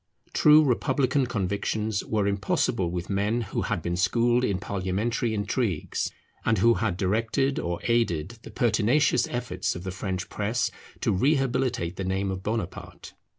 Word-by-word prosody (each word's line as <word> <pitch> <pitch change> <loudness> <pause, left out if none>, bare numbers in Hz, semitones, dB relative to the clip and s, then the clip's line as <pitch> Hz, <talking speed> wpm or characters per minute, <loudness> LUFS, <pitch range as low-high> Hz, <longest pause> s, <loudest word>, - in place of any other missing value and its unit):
True 150 +1 +7
republican 130 0 +1
convictions 105 0 -1
were 105 -2 0
impossible 100 -2 0
with 90 0 -4
men 105 +4 0
who 110 - -3
had - - -2
been 85 0 -1
schooled 120 +7 +2
in 100 -7 +1
parliamentary 100 +5 -1
intrigues, 105 - -1 0.3
and 115 - +2
who 115 +5 +5
had 110 -6 -1
directed 115 +8 0
or 85 0 -2
aided 115 -3 0
the - - -11
pertinacious 120 +3 +2
efforts 120 -1 -2
of 90 - -7
the 95 - -4
French 95 -1 -4
press 110 +3 -1 0.3
to - - +2
rehabilitate 130 - +1
the 95 - -3
name 95 +1 -1
of 95 0 -4
Bonaparte. 105 -3 -5
105 Hz, 150 wpm, -26 LUFS, 95-120 Hz, 0.3 s, True